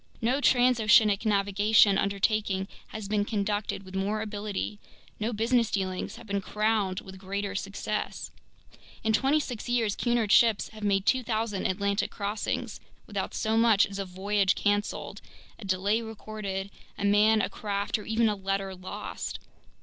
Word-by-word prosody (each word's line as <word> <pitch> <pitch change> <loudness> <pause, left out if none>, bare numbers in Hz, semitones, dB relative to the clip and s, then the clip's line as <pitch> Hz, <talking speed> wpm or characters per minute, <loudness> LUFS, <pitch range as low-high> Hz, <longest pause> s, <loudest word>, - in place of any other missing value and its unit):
No 250 +5 +1
transoceanic 225 -5 +4
navigational 205 0 +4
undertaking 200 -1 0 0.2
has 215 -2 -7
been 205 0 +1
conducted 205 -2 -2
with 185 0 -12
more 200 +3 -1
ability, 210 -1 -4 0.4
no 220 +2 -1
business 230 +1 +2
dealings 185 -2 -2
have 235 - -12
been 200 -1 -2
crowned 210 -2 0
with 190 0 -11
greater 200 +1 -3
success. 200 +2 -4 0.7
In 220 -1 +2
twenty 270 +7 +3
six 245 -6 -5
years 230 -4 +1
Cunard 235 -4 +1
ships 225 -2 +4
have 215 0 -12
made 195 -1 +1
2,000 225 -5 0
Atlantic 200 +2 0
crossings 205 +1 -3 0.3
without - - -4
so 220 0 0
much 225 -3 +5
as 200 0 -7
a 195 - -2
voyage 195 +1 +1
canceled, 205 0 -1 0.4
a 215 - -9
delay 195 +4 +1
recorded, 210 -3 -5 0.3
a 200 - -2
man, 210 +2 +5
a - - +1
craft, 200 0 -2
or 210 - -9
even 225 +1 +2
a 210 - +1
letter 195 0 -2
lost. 185 0 -6
205 Hz, 150 wpm, -28 LUFS, 195-220 Hz, 0.7 s, much